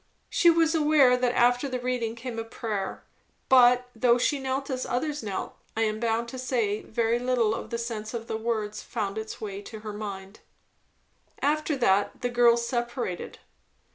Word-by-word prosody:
She 345 - +5
was 330 -1 +4
aware 295 -5 +5
that 250 -1 0
after 245 +3 +3
the 255 - -2
reading 245 -2 -2
came 230 -1 -6
a - - -2
prayer; 215 -4 -4 0.5
but 250 -1 +6
though 240 +1 +4
she 280 +3 +1
knelt 265 +1 -2
as 255 -1 -2
others 295 +4 -2
knelt, 200 -3 -4 0.2
I - - +1
am 215 0 -1
bound 230 0 0
to 260 - -7
say 230 -5 0
very 230 +1 0
little 245 -3 +1
of - - -5
the 235 - -2
sense 225 -2 -4
of 230 -1 -4
the 220 - -4
words 220 -2 -2
found 200 +1 -3
its 220 0 -7
way 200 -2 -5
to 215 +1 -9
her 215 -1 -6
mind. 200 -1 -7 1.0
After 300 0 0
that 205 -5 +2
the 245 - 0
girls 235 -1 +4
separated. 240 -6 -3
235 Hz, 175 wpm, -27 LUFS, 220-255 Hz, 1.0 s, but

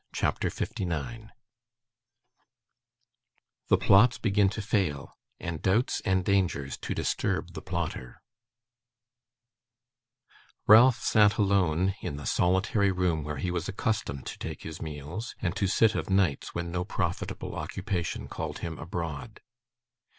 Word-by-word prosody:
CHAPTER - - 0
59 100 +6 -4 2.4
The - - +5
Plots 110 +5 +5
begin 100 -2 +2
to 105 - -5
fail, 90 -10 -1 0.2
and 85 -2 -5
Doubts 110 +7 +1
and 95 -3 +1
Dangers 90 -9 +1
to - - -4
disturb - - -1
the - - -6
Plotter 60 -1 -5 2.4
Ralph 120 +3 +7
sat 105 -1 +4
alone, 95 -3 +2
in 70 - -4
the 75 - -8
solitary 95 +2 +2
room 90 -4 0
where 75 0 -4
he 90 +6 -2
was 90 0 -2
accustomed 100 -8 -2
to - - -7
take - - -6
his 80 -1 -7
meals, 80 - -6
and 90 -5 -2
to 100 - +1
sit 110 +3 +4
of - - -3
nights 95 -7 +1
when 85 0 -3
no 90 +1 -1
profitable 90 -1 -3
occupation 90 -2 -3
called - - -5
him 80 -2 -5
abroad. 85 +3 -5
95 Hz, 125 wpm, -28 LUFS, 80-100 Hz, 2.4 s, Ralph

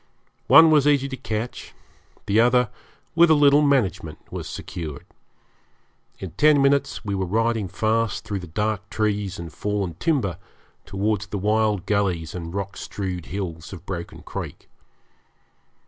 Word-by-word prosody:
One 160 -1 +8
was 150 -2 +4
easy 140 -2 +3
to 135 - -4
catch, 115 -2 -5 0.5
the 105 +2 +2
other 125 -1 +4 0.4
with 170 0 +5
a 160 - +6
little 145 0 +5
management 110 - +1
was - - -5
secured. 80 -5 -7 1.1
In 95 - -7
ten 150 - +4
minutes 140 -3 +1
we 100 - -2
were 95 -1 -1
riding 115 +1 0
fast 110 +4 0
through 100 -2 -3
the 90 - -9
dark 105 +3 -2
trees 105 -3 -1
and 85 -2 -8
fallen 105 -4 -2
timber 120 - 0 0.5
towards 105 +1 -1
the 100 - -4
wild 105 -1 +1
gullies 95 -6 0
and 85 -2 -6
rock 100 +1 -4
strewed 90 -4 -5
hills 90 -3 -5
of 95 - -10
Broken 85 -3 -6
Creek. - - -7
105 Hz, 145 wpm, -23 LUFS, 95-120 Hz, 1.1 s, One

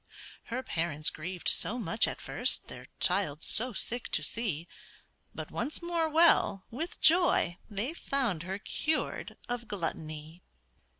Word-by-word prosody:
Her 250 +3 -3
parents 160 - 0
grieved 175 +3 -5
so 235 - +2
much 215 -2 +3
at - - -4
first - - +1
Their - - -9
child 180 -5 +1
so 250 +3 0
sick 240 +3 -2
to 155 - +3
see; 175 -4 -2 0.7
But - - -6
once 300 - -1
more 340 -2 0
well, 310 - +4
with 320 +9 -4
joy 315 - +4
they 215 +8 -2
found 260 - -1
Her 185 +3 -3
cured 310 +9 -1
of 240 -1 -3
gluttony. 160 -3 -5
210 Hz, 135 wpm, -31 LUFS, 170-265 Hz, 0.7 s, well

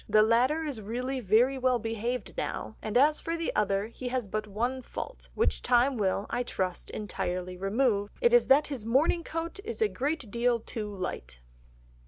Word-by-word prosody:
The 215 0 +6
latter 250 +8 +3
is 280 -8 -4
really 250 +5 -3
very 245 +5 +3
well 255 -1 +3
behaved 230 +2 -3
now, - - -4
and 215 +2 0
as 300 +4 +4
for 330 0 -2
the 330 - -2
other 200 -1 +1
he 235 +3 -7
has 250 -3 -1
but 215 +2 -3
one 240 +6 -2
fault, - - -7
which 455 - +1
time 250 +2 +3
will, 200 -2 0
I - - 0
trust, 185 -7 -3
entirely 185 -3 -3
remove, 205 +2 +1
it 475 -1 +3
is 485 - +6
that 280 +3 +6
his 270 -7 -5
morning 280 +9 +2
coat 330 +4 -4
is 465 +2 -5
a 440 - +4
great 285 - -3
deal 235 +1 +2
too 215 -1 -5
light." 180 - -5
240 Hz, 185 wpm, -29 LUFS, 210-275 Hz, -, The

